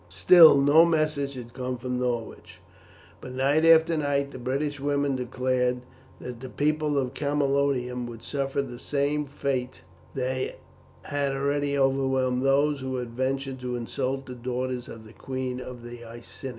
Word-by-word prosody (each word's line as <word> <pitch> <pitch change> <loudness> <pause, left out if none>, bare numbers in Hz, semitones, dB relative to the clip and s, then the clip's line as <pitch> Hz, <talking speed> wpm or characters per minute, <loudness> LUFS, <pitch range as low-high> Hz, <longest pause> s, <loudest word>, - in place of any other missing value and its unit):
Still 165 -5 +7
no 145 +4 +6
message 155 -4 0
had 120 -2 -9
come 125 -1 -4
from 125 0 -3
Norwich, 120 -2 -4 0.6
but 130 - -8
night 140 +4 +2
after 165 0 +6
night 140 -2 0
the 130 - -9
British 140 +4 -2
women 140 0 0
declared 125 0 -1 0.4
that 125 -2 -7
the 130 +1 -8
people 150 +1 0
of 130 -2 -1
Camalodunum 140 -4 0
would 115 -1 -10
suffer 140 0 -2
the 120 -3 -9
same 145 +1 -1
fate 130 -2 -3 0.3
that 130 0 -2 0.5
had 140 -1 -1
already 140 +1 0
overwhelmed 130 -2 +1
those 140 +2 +2
who 130 0 -4
had 125 -2 -4
ventured 130 +2 -2
to 125 -1 -4
insult 130 +3 -3
the 125 - -8
daughters 125 0 -4
of 110 -1 -10
the 110 - -14
queen 130 -1 -4
of 125 -1 -9
the 120 0 -9
Iceni. 120 +3 -9
135 Hz, 155 wpm, -26 LUFS, 125-140 Hz, 0.6 s, Still